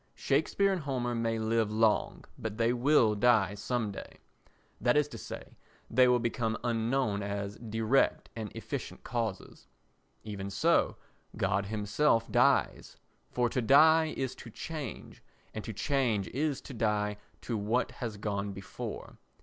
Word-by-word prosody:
Shakespeare 195 +8 +1
and 185 - -2
Homer 125 -4 -2
may 115 -1 0
live 110 -1 +1
long, 110 0 +1
but 110 -1 -5
they 115 +1 +2
will 125 -3 +4
die 105 -3 +3
some 110 +1 -2
day, 100 - -9 0.6
that 120 +4 +3
is 150 -1 +3
to - - -8
say, - - -9 0.4
they 125 +2 +5
will 125 0 +5
become 115 -1 -1
unknown 115 -2 0
as 100 0 -4
direct 115 +3 +1
and 110 -3 -5
efficient - - -6
causes. 115 -5 -4 0.6
Even 100 -2 -5
so 95 - +2 0.4
God 100 +1 0
himself 110 +4 +1
dies, - - +2 0.3
for 125 -1 +1
to 125 - -1
die 155 +6 +5
is 130 -2 -2
to 120 - -10
change 150 +2 -7 0.3
and 110 - -5
to - - -5
change 110 -2 0
is 145 +1 -1
to - - -10
die 105 -2 0 0.2
to 120 - -3
what 110 +4 0
has 115 -4 -5
gone 100 -1 -3
before. 95 0 -7
115 Hz, 145 wpm, -30 LUFS, 105-125 Hz, 0.6 s, they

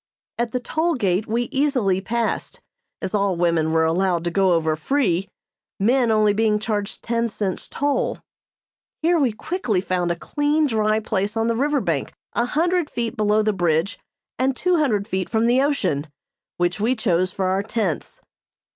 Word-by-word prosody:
At 235 -1 0
the 250 - -1
toll 320 +7 0
gate 200 -3 0
we 235 +2 0
easily 260 -10 +1
passed, 235 - -2 0.4
as 185 - -3
all 200 -3 +1
women 170 -2 +1
were 160 0 +3
allowed 175 +1 +1
to 175 - -1
go 190 0 +3
over 160 -2 +1
free, 190 - 0 0.5
men 240 +4 +3
only 215 -2 +3
being 215 0 +2
charged 210 -1 -3
ten 235 0 0
cents 205 -4 -3
toll. 285 0 -1 0.9
Here 340 +1 +3
we 265 -5 +2
quickly 220 - -2
found 180 -1 -1
a - - 0
clean, 295 - 0
dry 215 -4 +1
place 210 0 -2
on 225 - +1
the 230 0 +1
river 285 +4 +1
bank - - -2 0.2
a 235 - +1
hundred 335 +4 +1
feet 235 -1 -3
below 215 0 +2
the 215 0 +1
bridge 175 +1 0 0.4
and 260 0 +1
two 360 -1 +2
hundred 220 -10 +1
feet 190 -4 -2
from 225 0 +1
the 245 +3 +4
ocean, 270 - 0 0.5
which 175 +2 0
we 235 +5 +1
chose 185 -5 +1
for 190 - -2
our 190 +1 +1
tents. 205 -5 -3
215 Hz, 175 wpm, -22 LUFS, 185-250 Hz, 0.9 s, the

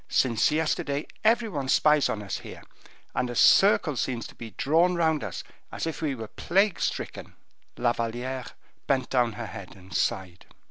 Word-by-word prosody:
Since 115 -4 +3
yesterday 150 -2 -1 0.2
every 225 +1 +3
one 140 -9 -4
spies 150 0 +4
on 105 - -3
us 100 - -4
here, - - -10 0.5
and 125 - -1
a 120 - -5
circle 195 - +5
seems 120 -3 -2
to - - -10
be 115 - -9
drawn 170 +5 +3
round 160 -3 +1
us, - - -5 0.3
as - - -4
if 165 0 -4
we 145 -4 -1
were 115 -3 -7
plague 195 - +1
stricken." - - -4 0.4
La 120 -1 +2
Valliere 120 +3 -3 0.4
bent 135 -2 0
down 120 -3 +2
her 115 +2 -6
head 95 -2 -9
and 95 +1 -12
sighed. 90 -2 -2
130 Hz, 175 wpm, -27 LUFS, 115-160 Hz, 0.5 s, circle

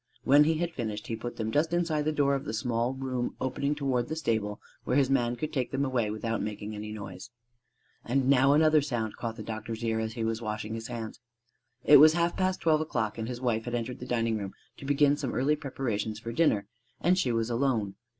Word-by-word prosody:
When 145 +2 +6
he 160 +1 +2
had 170 +1 -2
finished, 110 -6 -4
he 115 - -3
put 120 +2 -6
them 110 -1 -3
just 160 +6 +1
inside 165 -4 +1
the 155 - +2
door 145 -2 +2
of 135 - -2
the 110 - -3
small 120 +2 -1
room 130 -2 -3
opening 140 +3 -1
toward 135 -4 0
the 155 - -3
stable 110 -9 -1 0.2
where 125 - +1
his 135 -2 +3
man 120 -3 +2
could 155 +5 -4
take 130 -4 -1
them 135 +1 0
away 125 -5 0
without 110 +1 -2
making 105 0 -5
any 105 0 -6
noise. 100 -1 -8 0.7
And 130 +2 0
now 135 0 +5
another 155 0 +5
sound 120 -7 -3
caught 115 -2 -4
the 110 - -7
doctor's 110 +1 -5
ear 110 -1 0
as 110 0 -3
he 115 - -3
was 115 0 -1
washing 110 0 -4
his 115 +1 -5
hands. 115 -1 -6 0.6
It 150 - +8
was 155 +2 +8
half 170 0 +1
past 185 0 0
twelve 155 -2 +3
o'clock; 115 -8 -2
and 110 - -3
his 125 0 -5
wife 115 -3 0
had 120 0 -2
entered 120 +1 -4
the 125 - -7
dining 115 -3 0
room 100 -1 -6 0.2
to - - -10
begin 145 +1 +3
some 140 -4 -3
early 145 +4 +2
preparations 125 -7 -3
for 115 +1 -6
dinner, 115 -7 +2 0.3
and 180 +2 +3
she 135 -9 +1
was 115 0 0
alone. 115 -5 0
120 Hz, 230 wpm, -29 LUFS, 110-145 Hz, 0.7 s, It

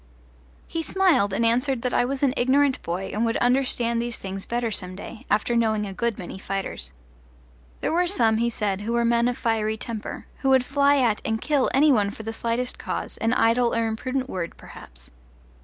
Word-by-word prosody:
He 330 - -3
smiled 335 - +2
and 230 +4 +1
answered 250 +2 +1
that 250 - -1
I - - +3
was 275 +2 -3
an 265 -2 +3
ignorant 270 +2 +2
boy 180 +3 -4
and 215 - 0
would 230 0 +1
understand 245 -2 +1
these 240 -1 -4
things 195 0 -6
better 235 -1 -1
some 185 -3 -4
day, 215 +3 -10
after 215 +3 +1
knowing 220 -2 +1
a 195 - -6
good 235 +3 -1
many 185 0 -7
fighters. 190 - -4 0.9
There - - 0
were 355 +1 +2
some, 230 - +2
he 235 +1 +1
said, 205 -4 -2
who 225 +3 -2
were 235 0 +2
men 235 0 +3
of 245 - -1
fiery 220 -1 0
temper, 220 -1 -6
who 270 - 0
would 260 -1 +4
fly 280 +1 +3
at 235 -5 +2
and 220 0 -1
kill 285 0 +1
any 295 +3 +5
one 210 -6 +3
for 220 - -9
the 225 +1 -4
slightest 235 +2 -2
cause - - -4
an 225 +1 +1
idle 235 0 +3
or 230 0 +1
imprudent 255 +4 -2
word 175 -8 -5
perhaps. - - -12
235 Hz, 205 wpm, -24 LUFS, 215-255 Hz, 0.9 s, any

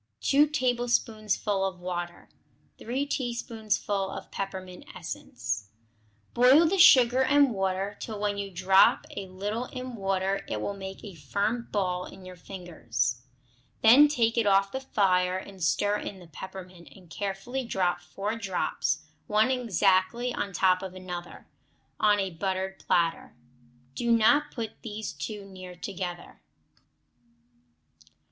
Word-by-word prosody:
2 290 +2 +4
tablespoonfuls 240 -6 0 0.3
of - - -20
water. 175 -1 -5 0.5
3 260 +5 -2
teaspoonfuls 220 -6 -2
of - - -10
peppermint 185 -2 -6
essence. 115 - -5 0.7
Boil 260 +7 +6
the 380 +4 +1
sugar 255 -5 +7
and 285 0 +4
water 195 0 -1
till 215 -3 -6
when 205 0 0
you 200 0 -4
drop 190 +1 +4
a 195 - -5
little 205 +6 -3
in 255 0 -7
water 195 -2 -1
it 105 - -3
will 200 - -3
make 195 -1 -8
a 205 -3 -8
firm 200 - -2
ball 180 -3 -1
in 190 - -13
your 185 0 -9
fingers. 120 - -3 0.6
Then 255 +7 +8
take 235 -5 +1
it 225 - +1
off 195 0 +4
the 265 - -3
fire 185 -7 +1
and 190 -1 -8
stir 205 +7 +2
in 200 - -6
the 180 - -13
peppermint, 180 0 -10
and 185 -2 -16
carefully 200 +9 -4
drop 185 -6 0
four 205 +3 -4
drops, 190 -7 -1 0.2
one 215 +4 +3
exactly 230 0 +2
on 200 - -3
top 185 0 +3
of 190 -1 -7
another, 180 -1 -8 0.5
on 210 -1 +4
a 195 -1 -1
buttered 190 +2 -3
platter. 165 -1 0 0.6
Do 235 - -1
not 285 +7 +4
put 230 -6 -6
these 215 -1 -5
too 200 +8 -6
near 185 -2 -10
together. 180 -1 -6
195 Hz, 135 wpm, -28 LUFS, 185-230 Hz, 0.7 s, Then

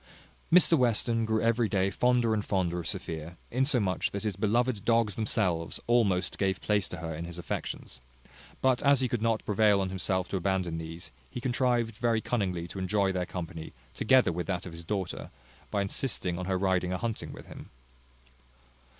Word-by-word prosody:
Mr 175 -1 +7
Western 115 -3 +2
grew 110 0 0
every 115 -1 +2
day 95 -1 +1
fonder 120 +1 +2
and 105 -1 0
fonder 90 -4 0
of 85 - -5
Sophia, 80 +1 -5
insomuch 125 -7 +1
that 100 - -5
his 105 -4 -1
beloved 110 +2 +1
dogs 115 -3 +2
themselves 90 -7 0
almost 100 -6 +2
gave 95 -2 +1
place 105 -2 +1
to 90 - -7
her 80 -1 -5
in 80 +2 -5
his 85 0 -7
affections; 85 -6 -5 0.6
but 130 -1 +3
as 140 -2 +4
he 130 - +2
could 120 -2 -2
not 115 -1 0
prevail 105 -1 +4
on 95 -1 -1
himself 95 0 -1
to 95 - -2
abandon 90 -2 -1
these, 80 +1 -7 0.2
he 125 - -6
contrived 120 -3 0
very 115 -2 +2
cunningly 95 -8 -2
to 95 - -7
enjoy 95 +1 +1
their 90 -1 -2
company, 85 -2 -6 0.2
together 130 -3 +4
with 85 +1 -4
that 90 -2 -2
of 90 - -7
his 85 0 -8
daughter, 95 +1 -3 0.4
by 100 -1 0
insisting 95 -4 -2
on 90 - -3
her 95 -1 +1
riding 90 -1 +1
a 90 - -1
hunting 115 +1 -4
with - - -11
him. - - -11
100 Hz, 185 wpm, -29 LUFS, 90-115 Hz, 0.6 s, Mr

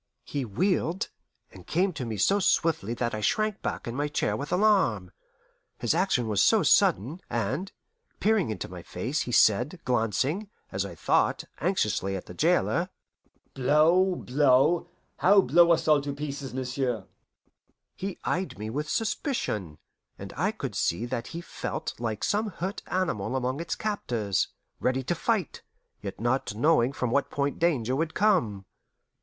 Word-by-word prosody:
He 140 -3 -3
wheeled, 175 - 0 0.4
and 90 -2 -14
came 185 +3 +1
to 135 -5 -4
me 110 -2 -4
so 195 - +3
swiftly 160 - +1
that 120 0 -2
I 110 - -3
shrank 215 - 0
back - - -4
in 115 - -3
my 145 +2 0
chair 150 - 0
with 145 - -5
alarm, 180 - +2 0.7
his 120 - +1
action 165 - +1
was 105 -3 +2
so - - +5
sudden, 135 - +3
and, 120 - -2 0.5
peering 210 - +2
into 105 -5 -4
my 90 -1 -9
face, 120 - -3
he 125 - -4
said, 125 - +3
glancing, 125 - 0 0.2
as 95 +1 -2
I 85 - -9
thought, - - +1 0.2
anxiously 105 - 0
at 95 - -6
the - - -10
jailer, - - +2 0.6
"Blow 160 +8 +4
blow 140 +3 +3 0.3
how 200 +2 +6
blow 170 -1 +5
us 165 - +2
all 150 -2 +5
to 140 0 -4
pieces, 140 -2 -5
m'sieu'?" 130 -4 -2 0.9
He 195 0 -5
eyed 185 - -2
me 110 +2 -5
with 150 +5 -3
suspicion, 110 - -2 0.4
and - - -8
I - - +1
could - - -5
see 85 +8 0
that 120 -1 -4
he 170 - -6
felt - - -5
like 110 -3 -3
some 210 +2 +1
hurt 190 +1 -4
animal 125 - -1
among 130 +2 -1
its 170 - -3
captors, 115 - -1 0.3
ready 130 +1 0
to 130 - 0
fight, 195 +1 -1 0.4
yet 100 -1 -6
not 120 -1 0
knowing 125 0 +3
from 125 -3 -2
what 140 +2 +1
point 140 0 -2
danger 130 -8 +1
would 160 +2 -2
come. 140 - +2
140 Hz, 160 wpm, -27 LUFS, 115-175 Hz, 0.9 s, how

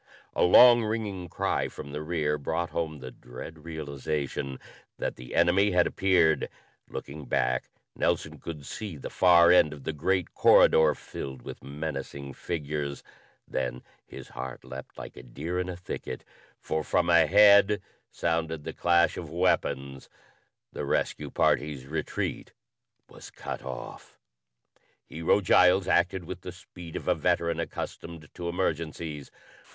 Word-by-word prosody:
A - - 0
long 120 +6 +8
ringing 105 -5 -3
cry - - -1
from 70 - -9
the 75 +1 -4
rear 75 -2 -1
brought 80 +4 -2
home 80 -2 -2
the 65 0 -7
dread 75 +6 -10
realization 70 -3 -4 0.4
that - - -3
the 60 0 -9
enemy 100 +3 +4
had 90 -1 +4
appeared. 85 -6 +2 0.4
Looking 70 +1 -7
back, 65 0 0 0.3
Nelson - - -1
could 75 -4 -7
see 100 -2 -6
the 70 - -7
far 85 -2 +6
end 75 -4 +5
of 70 -3 -11
the 80 - -3
great 90 +4 0
corridor 80 -1 +6
filled 65 -3 -8
with - - -9
menacing 70 -1 -5
figures. 75 -3 -4 0.4
Then 60 0 -3 0.2
his - - -11
heart 65 -2 -7
leaped 65 +1 -9
like - - -9
a - - -8
deer 75 +9 -4
in 90 0 -2
a 90 - -4
thicket, 90 - -6 0.4
for 80 0 -2
from 85 +2 +1
ahead 100 +4 +6 0.3
sounded 80 -2 -2
the - - -5
clash 85 +1 +3
of 85 - -6
weapons! 70 -6 -1 0.6
The - - -4
rescue - - -1
party's 75 -4 +1
retreat 80 +2 -4 0.5
was - - -12
cut - - -7
off! - - -8 0.9
Hero 85 +5 +1
Giles 90 0 +5
acted 90 +1 +2
with 90 +1 -7
the 90 - -7
speed 90 -1 -12
of - - -5
a - - +5
veteran 85 -1 0
accustomed 85 -1 -6
to 85 -1 -4
emergencies. 80 -4 -3
80 Hz, 140 wpm, -28 LUFS, 70-90 Hz, 0.9 s, long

